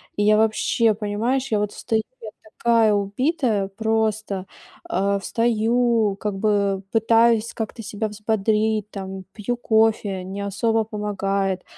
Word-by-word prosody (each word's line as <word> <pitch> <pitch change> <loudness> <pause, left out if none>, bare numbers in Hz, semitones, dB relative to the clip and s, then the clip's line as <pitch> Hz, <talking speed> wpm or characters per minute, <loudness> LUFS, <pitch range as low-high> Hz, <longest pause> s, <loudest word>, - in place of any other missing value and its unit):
И 205 - 0
я 210 0 +5
вообще, 220 +1 +2
понимаешь, 220 +6 -1
я 215 - +2
вот 205 0 -1
встаю, 220 -1 -1 0.2
я 220 - -7 0.3
такая 230 -2 +3
убитая 210 - 0
просто. 215 -2 -1 0.4
А, 200 +1 0
встаю, 230 -1 +1
как 205 -1 -3
бы, 215 +2 +1 0.3
э, - - -12
пытаюсь 230 0 +3
как-то 225 0 -5
себя 210 +1 -3
взбодрить, 215 0 0
там, 190 -1 -7
пью 235 +3 -3
кофе- 220 -4 +1
не 190 +2 -6
особо 220 +3 0
помогает, 195 -3 -2
215 Hz, 135 wpm, -22 LUFS, 200-225 Hz, 0.4 s, я